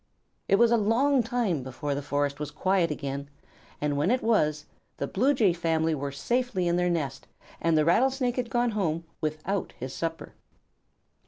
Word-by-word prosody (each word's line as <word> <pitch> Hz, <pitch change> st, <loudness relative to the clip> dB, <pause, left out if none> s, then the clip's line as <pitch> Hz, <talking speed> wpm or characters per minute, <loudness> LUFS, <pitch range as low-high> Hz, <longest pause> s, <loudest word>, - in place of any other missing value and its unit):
It 195 Hz, -, +4 dB
was 235 Hz, +3 st, +4 dB
a 235 Hz, -, +5 dB
long 250 Hz, +6 st, +3 dB
time 230 Hz, -, -1 dB
before 130 Hz, +3 st, -4 dB
the 140 Hz, -, -2 dB
forest 145 Hz, 0 st, -1 dB
was 150 Hz, -1 st, -3 dB
quiet 175 Hz, +3 st, +1 dB
again, 140 Hz, -1 st, -4 dB, 0.5 s
and 145 Hz, -1 st, 0 dB
when 145 Hz, +6 st, +1 dB
it 250 Hz, +2 st, +1 dB
was, 155 Hz, -10 st, +2 dB, 0.3 s
the -, -, -2 dB
Blue 245 Hz, -, +2 dB
Jay 210 Hz, -8 st, +3 dB
family 165 Hz, -1 st, 0 dB
were 140 Hz, -1 st, -3 dB
safely 225 Hz, -, -1 dB
in 170 Hz, -, +2 dB
their 180 Hz, 0 st, +2 dB
nest, 140 Hz, -6 st, -2 dB, 0.3 s
and 165 Hz, -1 st, +3 dB
the 155 Hz, -, +3 dB
Rattlesnake 250 Hz, -, +2 dB
had 245 Hz, -2 st, -1 dB
gone 240 Hz, 0 st, +1 dB
home 170 Hz, -6 st, -1 dB, 0.2 s
without 155 Hz, +5 st, -2 dB
his 130 Hz, +1 st, -6 dB
supper. 165 Hz, -1 st, -4 dB
170 Hz, 175 wpm, -27 LUFS, 150-230 Hz, 0.5 s, a